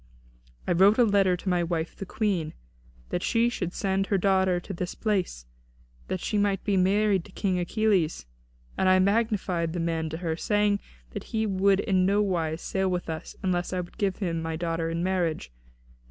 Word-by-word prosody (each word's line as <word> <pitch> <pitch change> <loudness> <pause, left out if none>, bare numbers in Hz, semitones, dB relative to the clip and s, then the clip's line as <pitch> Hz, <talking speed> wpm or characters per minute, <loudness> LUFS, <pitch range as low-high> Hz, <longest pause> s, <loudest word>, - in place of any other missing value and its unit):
I - - +1
wrote 195 +5 +5
a 245 - +6
letter 200 -4 +3
to 185 - -11
my 180 -2 +2
wife 165 -1 -2
the 195 - -7
Queen, 185 -8 -1 0.5
that 175 - -2
she 230 +4 +2
should 180 -7 -3
send 195 +1 -1
her 200 - +2
daughter 190 -1 +2
to 195 - -7
this 180 0 -4
place, 190 - -1 0.6
that 185 - -2
she 210 +4 -1
might 200 -2 +1
be 205 - +1
married 195 0 +2
to 205 - -14
King 185 -1 -1
Achilles; 180 - +1 0.5
and 190 - +3
I 185 - +6
magnified 190 -4 +1
the 175 - -3
man 165 -1 -1
to 160 - -5
her, 165 -2 -2
saying 205 +3 +1 0.3
that - - -6
he 220 -1 -1
would 195 0 +2
in 190 -4 +2
no 200 +1 +3
wise 170 -5 -1
sail 190 -1 0
with 180 -2 -2
us 160 - -7
unless 180 -1 -1
I 180 - 0
would 175 +5 -12
give 195 -3 +1
him 170 -5 -2
my 160 0 -3
daughter 165 0 -2
in 165 +1 -2
marriage. 175 - -1
185 Hz, 195 wpm, -27 LUFS, 170-200 Hz, 0.6 s, a